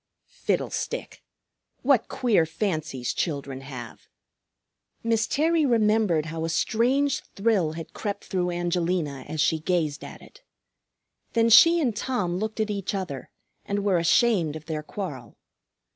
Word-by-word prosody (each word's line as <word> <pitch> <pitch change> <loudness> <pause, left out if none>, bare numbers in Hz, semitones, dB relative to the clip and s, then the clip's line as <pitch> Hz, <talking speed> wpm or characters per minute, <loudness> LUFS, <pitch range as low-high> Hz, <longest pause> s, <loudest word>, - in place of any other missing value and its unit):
Fiddlestick! - - -3 0.6
What 265 -3 +3
queer 210 -10 +2
fancies 155 - -2
children 140 -5 -3
have! 125 -4 -9 1.0
Miss 225 -1 +1
Terry 320 +2 +2
remembered 215 - +2
how 160 +1 -4
a 165 - -1
strange 255 - +1
thrill 195 -7 +1
had 165 0 -8
crept 200 -2 -4
through 180 -1 -1
Angelina 175 -5 -1
as 155 - -5
she 160 +1 +2
gazed 155 -3 -1
at - - -10
it. - - -17 0.9
Then 230 0 +3
she 335 +9 +8
and 250 -9 0
Tom 205 -8 -1
looked 215 +3 -4
at 215 -1 0
each 200 0 -3
other 160 -9 -5 0.3
and 200 0 -2
were 195 -4 +2
ashamed 170 -2 +3
of 155 0 -8
their 155 -1 -3
quarrel. 150 - -7
185 Hz, 135 wpm, -26 LUFS, 155-225 Hz, 1.0 s, she